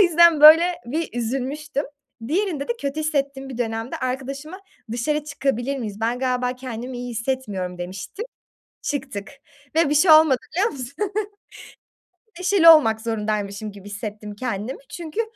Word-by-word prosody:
yüzden 340 Hz, -3 st, +5 dB
böyle 315 Hz, +3 st, +10 dB, 0.2 s
bir 315 Hz, +7 st, -2 dB
üzülmüştüm. 270 Hz, +5 st, -2 dB, 0.4 s
Diğerinde 335 Hz, -4 st, -1 dB
de -, -, +2 dB
kötü 280 Hz, +2 st, -2 dB
hissettiğim 280 Hz, -3 st, -2 dB
bir 255 Hz, -3 st, -7 dB
dönemde 225 Hz, 0 st, -3 dB
arkadaşıma 275 Hz, +7 st, -4 dB, 0.3 s
dışarı 295 Hz, +5 st, -1 dB
çıkabilir 275 Hz, -2 st, -2 dB
miyiz? 215 Hz, -4 st, -6 dB
Ben 235 Hz, +2 st, 0 dB
galiba 250 Hz, -1 st, -1 dB
kendimi 250 Hz, 0 st, -6 dB
iyi 245 Hz, 0 st, -5 dB
hissetmiyorum 220 Hz, -7 st, -3 dB
demiştim. 185 Hz, -, -6 dB, 0.6 s
Çıktık 265 Hz, -8 st, -4 dB, 0.5 s
ve 325 Hz, -2 st, +4 dB
bir -, -, +2 dB
şey 320 Hz, +4 st, +5 dB
olmadı 310 Hz, -4 st, +7 dB, 0.2 s
biliyor 405 Hz, +6 st, +2 dB
musun? 255 Hz, -3 st, -7 dB, 1.5 s
Neşeli 365 Hz, -2 st, +6 dB
olmak 225 Hz, -9 st, +6 dB
zorundaymışım 210 Hz, -2 st, -3 dB
gibi 200 Hz, 0 st, -12 dB
hissettim 210 Hz, 0 st, -6 dB
kendimi. 230 Hz, +1 st, -4 dB
Çünkü 340 Hz, +5 st, -3 dB
260 Hz, 135 wpm, -23 LUFS, 225-300 Hz, 1.5 s, böyle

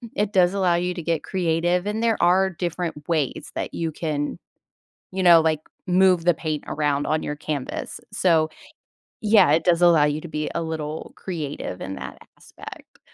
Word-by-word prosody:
it 210 Hz, 0 st, -1 dB
does 180 Hz, 0 st, +4 dB
allow 185 Hz, -3 st, +2 dB
you 180 Hz, +1 st, -1 dB
to 170 Hz, -, -5 dB
get 165 Hz, -2 st, 0 dB
creative, 175 Hz, 0 st, 0 dB
and 210 Hz, +2 st, -2 dB
there 230 Hz, -2 st, +2 dB
are 185 Hz, +2 st, +4 dB
different 170 Hz, -3 st, -4 dB
ways 155 Hz, -5 st, -1 dB
that -, -, -4 dB
you 165 Hz, -1 st, -2 dB
can, 150 Hz, -2 st, -3 dB, 0.7 s
you 190 Hz, 0 st, -2 dB
know, 170 Hz, -2 st, +8 dB
like, 160 Hz, -1 st, +1 dB, 0.3 s
move 180 Hz, -2 st, +4 dB
the 175 Hz, -, +5 dB
paint 155 Hz, -1 st, -4 dB
around 145 Hz, -1 st, 0 dB
on 155 Hz, 0 st, 0 dB
your 150 Hz, -, -4 dB
canvas. 145 Hz, -2 st, -5 dB
So, 165 Hz, -5 st, +2 dB, 0.7 s
yeah, 210 Hz, -8 st, +5 dB
it 160 Hz, -, +2 dB
does 175 Hz, -1 st, +3 dB
allow 170 Hz, -4 st, +6 dB
you 150 Hz, +1 st, 0 dB
to 170 Hz, -, -8 dB
be 150 Hz, -1 st, -3 dB
a 170 Hz, -, -1 dB
little 160 Hz, -1 st, -5 dB
creative 150 Hz, -, -5 dB
in 95 Hz, 0 st, -5 dB
that -, -, -8 dB, 0.2 s
aspect. -, -, -13 dB
170 Hz, 180 wpm, -23 LUFS, 155-180 Hz, 0.7 s, know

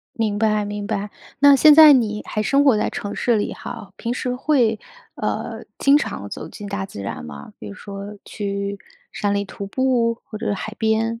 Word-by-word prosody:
明 215 Hz, -3 st, -1 dB
白， 215 Hz, -1 st, +1 dB
明 205 Hz, 0 st, -5 dB
白。 205 Hz, -1 st, -3 dB, 0.3 s
那 285 Hz, 0 st, +7 dB
现 300 Hz, +2 st, +7 dB
在 310 Hz, -1 st, +10 dB
你 215 Hz, -5 st, +1 dB
还 215 Hz, -, -2 dB
生 280 Hz, +5 st, +3 dB
活 260 Hz, -6 st, +5 dB
在 -, -, 0 dB
城 205 Hz, 0 st, -5 dB
市 235 Hz, -2 st, +1 dB
里 205 Hz, -, -1 dB
哈？ 195 Hz, -2 st, -9 dB
平 235 Hz, -, -3 dB
时 250 Hz, 0 st, -2 dB
会， 250 Hz, -5 st, +2 dB, 0.4 s
呃， -, -, -4 dB
经 280 Hz, +1 st, +5 dB
常 300 Hz, -, -3 dB
走 -, -, -7 dB
进 205 Hz, -1 st, -9 dB
大 200 Hz, -1 st, -3 dB
自 145 Hz, -, -9 dB
然 100 Hz, -5 st, -5 dB
吗？ 70 Hz, -1 st, -10 dB
比 105 Hz, -, -9 dB
如 100 Hz, -, -8 dB
说 200 Hz, +1 st, -8 dB
去 200 Hz, -1 st, -4 dB, 0.3 s
山 205 Hz, -1 st, -1 dB
里 200 Hz, 0 st, 0 dB
徒 200 Hz, 0 st, -8 dB
步 240 Hz, 0 st, +1 dB
或 215 Hz, -, -9 dB
者 220 Hz, -2 st, -2 dB
海 215 Hz, +3 st, -6 dB
边 225 Hz, +1 st, 0 dB
215 Hz, 215 characters per minute, -21 LUFS, 200-245 Hz, 0.4 s, 在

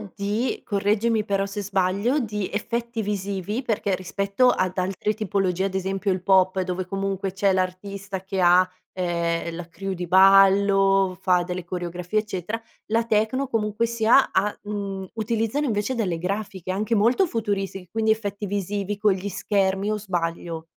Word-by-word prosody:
di 210 Hz, +5 st, -1 dB
correggimi 210 Hz, +2 st, +1 dB
però 195 Hz, -2 st, 0 dB
se 205 Hz, +1 st, -5 dB
sbaglio, 200 Hz, +7 st, +1 dB
di 210 Hz, -6 st, -2 dB
effetti 235 Hz, +2 st, -2 dB
visivi 200 Hz, +2 st, -3 dB
perché, 205 Hz, -5 st, 0 dB
rispetto 200 Hz, +6 st, +1 dB
ad 185 Hz, -5 st, 0 dB
altre 190 Hz, +3 st, -1 dB
tipologie, 190 Hz, -3 st, 0 dB
ad 195 Hz, -1 st, -1 dB
esempio 195 Hz, +1 st, -1 dB
il 185 Hz, -1 st, -1 dB
pop, 190 Hz, 0 st, +3 dB
dove 185 Hz, 0 st, -3 dB
comunque 195 Hz, 0 st, -2 dB
c'è 195 Hz, +1 st, +2 dB
l'artista 190 Hz, +1 st, -3 dB
che 190 Hz, 0 st, -3 dB
ha, 180 Hz, +1 st, +5 dB, 0.2 s
ehm, 170 Hz, -2 st, -1 dB
la 170 Hz, 0 st, -7 dB
crew 195 Hz, +3 st, -5 dB
di 180 Hz, -1 st, -4 dB
ballo, 195 Hz, 0 st, +5 dB
fa 180 Hz, -2 st, +3 dB
delle 180 Hz, +1 st, -4 dB
coreografie, 180 Hz, +3 st, -2 dB
eccetera, 210 Hz, +1 st, -4 dB, 0.3 s
la 230 Hz, +1 st, +2 dB
techno, 220 Hz, +5 st, +1 dB
comunque 225 Hz, -1 st, 0 dB
sia, 235 Hz, +3 st, +4 dB
ha 205 Hz, +2 st, +1 dB
uhm, 200 Hz, -2 st, -4 dB
utilizzano 225 Hz, +5 st, -1 dB
invece 220 Hz, +1 st, -1 dB
delle 185 Hz, -8 st, -1 dB
grafiche, 190 Hz, 0 st, -3 dB
anche 210 Hz, +4 st, -1 dB
molto 230 Hz, -, +4 dB
futuristi, 200 Hz, -, -3 dB
quindi 220 Hz, -1 st, +2 dB
effetti 205 Hz, -1 st, -2 dB
visivi 200 Hz, 0 st, -2 dB
con 205 Hz, -1 st, +3 dB
gli 190 Hz, +2 st, -4 dB
schermi, 195 Hz, 0 st, 0 dB
o 215 Hz, -, 0 dB
sbaglio? 170 Hz, -4 st, -3 dB
195 Hz, 155 wpm, -24 LUFS, 185-215 Hz, 0.3 s, ha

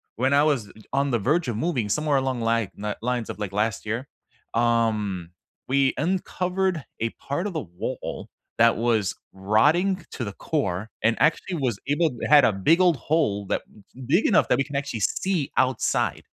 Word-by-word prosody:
when 130 Hz, +4 st, +1 dB
I 140 Hz, +1 st, +5 dB
was 135 Hz, -9 st, +1 dB, 0.2 s
on 140 Hz, 0 st, +1 dB
the 120 Hz, -, +1 dB
verge 150 Hz, -, +1 dB
of 120 Hz, -, -2 dB
moving 135 Hz, -8 st, -1 dB
somewhere 150 Hz, 0 st, +1 dB
along 130 Hz, -2 st, -1 dB
li 115 Hz, -3 st, +1 dB
na 105 Hz, 0 st, -4 dB
lines 125 Hz, -2 st, -1 dB
of -, -, -5 dB
like 105 Hz, -2 st, -3 dB
last 110 Hz, +2 st, -1 dB
year, 115 Hz, +5 st, -3 dB, 0.5 s
um, 110 Hz, -6 st, +1 dB, 0.4 s
we 135 Hz, 0 st, +2 dB
uncovered 180 Hz, +1 st, -1 dB, 0.2 s
a 115 Hz, +1 st, 0 dB
part 155 Hz, +8 st, -4 dB
of 195 Hz, -, -5 dB
the 155 Hz, -, -2 dB
wall 90 Hz, -5 st, -6 dB, 0.3 s
that 115 Hz, 0 st, +5 dB
was 110 Hz, -4 st, +1 dB, 0.2 s
rotting 150 Hz, -, +2 dB
to 125 Hz, -, -5 dB
the 100 Hz, -, -5 dB
core 110 Hz, -, -2 dB
and 115 Hz, +1 st, +3 dB
actually 170 Hz, +3 st, +2 dB
was 125 Hz, -8 st, -1 dB
able 155 Hz, +3 st, +2 dB
to 120 Hz, -, -6 dB
had 145 Hz, -1 st, +7 dB
a -, -, +4 dB
big 155 Hz, -, +3 dB
old 175 Hz, -5 st, +4 dB
hole 110 Hz, -7 st, 0 dB
that -, -, 0 dB, 0.5 s
big 170 Hz, -, +3 dB
enough 205 Hz, -, +4 dB
that -, -, +4 dB
we 140 Hz, -, +2 dB
can 145 Hz, -, -8 dB
actually 140 Hz, -5 st, -2 dB
see 175 Hz, -, 0 dB
outside. 130 Hz, 0 st, +1 dB
130 Hz, 185 wpm, -25 LUFS, 110-155 Hz, 0.5 s, had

